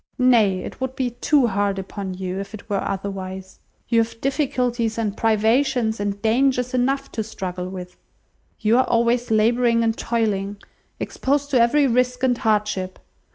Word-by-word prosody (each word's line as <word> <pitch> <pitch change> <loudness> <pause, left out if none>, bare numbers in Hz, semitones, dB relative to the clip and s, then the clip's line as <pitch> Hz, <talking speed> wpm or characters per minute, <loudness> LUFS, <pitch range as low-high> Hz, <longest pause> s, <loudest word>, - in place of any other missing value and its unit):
Nay, 225 -7 +4
it - - -8
would 260 0 -3
be 255 -2 -1
too 260 +3 +2
hard 200 -2 0
upon 190 0 -5
you, 185 0 -4
if 200 +2 -6
it 215 - -13
were 200 -3 -1
otherwise. 190 -1 -5 0.3
You 230 -1 +3
have 225 0 -4
difficulties, 250 -5 0
and 215 -3 -1
privations, 225 +1 +2
and 205 0 -2
dangers 250 +2 +2
enough 270 +2 0
to 220 - -2
struggle 185 -4 -5
with. 180 -1 -8 0.6
You 225 +3 +3
are 260 - +3
always 235 +1 +1
labouring 230 +2 +3
and 225 -1 +1
toiling, 205 -4 -1 0.4
exposed 285 +1 -1
to 255 -4 +4
every 280 +5 +4
risk 250 0 +1
and 255 -1 +3
hardship. 210 -4 -1
225 Hz, 155 wpm, -22 LUFS, 200-250 Hz, 0.6 s, Nay